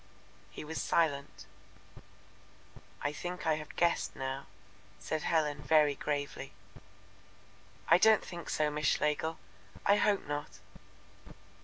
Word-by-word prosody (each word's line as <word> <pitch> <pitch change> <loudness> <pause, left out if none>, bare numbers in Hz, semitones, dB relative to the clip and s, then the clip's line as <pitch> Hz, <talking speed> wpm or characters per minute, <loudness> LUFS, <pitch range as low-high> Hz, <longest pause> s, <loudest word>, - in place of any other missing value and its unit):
He - - -8
was 160 +1 -3
silent. 145 -4 0 1.6
"I 145 - +1
think 180 +4 -5
I 160 -1 +2
have 150 -1 -9
guessed 170 -1 +1
now," 135 +1 -4 0.5
said 155 - -3
Helen 150 -3 0
very 150 -1 +4
gravely. 145 -2 -4 1.3
"I - - +6
don't 220 +1 +5
think 175 -2 -7
so, 150 -1 +1
Miss 150 -1 -1
Schlegel; 150 +2 +1 0.5
I 200 +1 +5
hope 205 -2 +2
not." 145 0 -4
150 Hz, 115 wpm, -32 LUFS, 145-170 Hz, 1.6 s, I